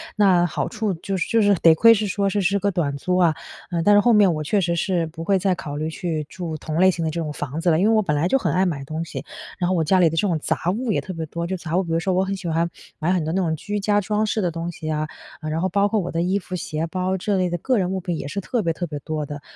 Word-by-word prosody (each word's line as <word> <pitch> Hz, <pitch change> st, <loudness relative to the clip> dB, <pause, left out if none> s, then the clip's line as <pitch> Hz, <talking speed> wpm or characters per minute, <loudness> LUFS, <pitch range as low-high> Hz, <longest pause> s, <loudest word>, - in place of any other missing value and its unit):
那 190 Hz, -4 st, +4 dB
好 175 Hz, -, -2 dB
处 215 Hz, -2 st, -2 dB
就 190 Hz, +3 st, -4 dB
是 175 Hz, -, -1 dB
就 230 Hz, -, +3 dB
是 205 Hz, -1 st, +4 dB
得 165 Hz, -2 st, +5 dB
亏 230 Hz, +7 st, +7 dB
是 215 Hz, -1 st, 0 dB
说 200 Hz, 0 st, 0 dB
这 205 Hz, -, 0 dB
是 200 Hz, +1 st, +2 dB
个 200 Hz, +1 st, +1 dB
短 160 Hz, -6 st, -1 dB
租 180 Hz, +6 st, -1 dB
啊。 170 Hz, -4 st, +3 dB, 0.4 s
呃， 170 Hz, -1 st, 0 dB
但 205 Hz, -, +5 dB
是 205 Hz, -, +7 dB
后 235 Hz, +3 st, +4 dB
面 205 Hz, -4 st, +5 dB
我 155 Hz, -, -3 dB
确 195 Hz, +7 st, +1 dB
实 170 Hz, -1 st, 0 dB
是 175 Hz, -1 st, 0 dB
不 160 Hz, +1 st, -9 dB
会 195 Hz, +1 st, +3 dB
再 190 Hz, 0 st, +1 dB
考 145 Hz, -4 st, -6 dB
虑 155 Hz, +2 st, -2 dB
去 160 Hz, -2 st, -3 dB
住 170 Hz, -3 st, -5 dB
同 155 Hz, +1 st, -4 dB
类 185 Hz, +1 st, +6 dB
型 170 Hz, -2 st, -4 dB
的 160 Hz, -, -1 dB
这 170 Hz, -, -3 dB
种 150 Hz, -2 st, -4 dB
房 145 Hz, +1 st, -5 dB
子 175 Hz, -, +1 dB
了。 160 Hz, -, +4 dB
因 185 Hz, -, +2 dB
为 -, -, +4 dB
我 215 Hz, -, +4 dB
本 150 Hz, -7 st, -1 dB
来 145 Hz, +3 st, +1 dB
就 270 Hz, -, +4 dB
很 170 Hz, -, -1 dB
爱 185 Hz, +3 st, +3 dB
买 155 Hz, -6 st, -2 dB
东 155 Hz, +3 st, -4 dB
西， 140 Hz, -4 st, -7 dB, 0.3 s
然 175 Hz, -, +1 dB
后 185 Hz, -, +1 dB
我 165 Hz, -, +2 dB
家 185 Hz, +4 st, +3 dB
里 170 Hz, -2 st, +5 dB
的 160 Hz, -, -4 dB
这 185 Hz, -, +1 dB
种 170 Hz, -5 st, 0 dB
杂 -, -, -1 dB
物 225 Hz, +2 st, -1 dB
也 -, -, 0 dB
特 190 Hz, -, -7 dB
别 165 Hz, -3 st, -4 dB
多， 170 Hz, +2 st, -4 dB
就 185 Hz, +2 st, -3 dB
杂 170 Hz, -1 st, -4 dB
物 185 Hz, -, +2 dB
比 170 Hz, -, -6 dB
如 165 Hz, -, +2 dB
说 185 Hz, +2 st, 0 dB
我 185 Hz, +1 st, +2 dB
很 195 Hz, +1 st, -2 dB
喜 180 Hz, -, -6 dB
欢 165 Hz, +1 st, +1 dB, 0.3 s
买 165 Hz, +2 st, +1 dB
很 185 Hz, -2 st, +2 dB
多 160 Hz, -, -2 dB
那 190 Hz, -, +1 dB
种 165 Hz, -3 st, 0 dB
居 205 Hz, +5 st, -3 dB
家 205 Hz, 0 st, +2 dB
装 210 Hz, +2 st, 0 dB
饰 215 Hz, -, -1 dB
的 180 Hz, -, +1 dB
东 170 Hz, +1 st, -4 dB
西 160 Hz, -1 st, -6 dB
啊。 155 Hz, 0 st, -1 dB, 0.4 s
呃， 155 Hz, -, -4 dB
然 155 Hz, +1 st, -1 dB
后 185 Hz, -, +1 dB
包 200 Hz, +2 st, +2 dB
括 215 Hz, -, +1 dB
我 180 Hz, -, -3 dB
的 165 Hz, -, -1 dB
衣 185 Hz, +3 st, +1 dB
服、 185 Hz, -1 st, -7 dB
鞋、 160 Hz, -1 st, -3 dB
包 185 Hz, +2 st, -1 dB
这 200 Hz, +2 st, -1 dB
类 185 Hz, -1 st, +1 dB
的 175 Hz, -, -2 dB
个 255 Hz, +8 st, 0 dB
人 185 Hz, -2 st, 0 dB
物 190 Hz, -, -1 dB
品 175 Hz, -2 st, -3 dB
也 140 Hz, -, -5 dB
是 200 Hz, -, -3 dB
特 230 Hz, +4 st, -1 dB
别 165 Hz, -, +1 dB
特 175 Hz, +2 st, -4 dB
别 150 Hz, -, -5 dB
多 155 Hz, 0 st, -4 dB
的。 145 Hz, 0 st, -7 dB
175 Hz, 355 characters per minute, -22 LUFS, 160-195 Hz, 0.4 s, 亏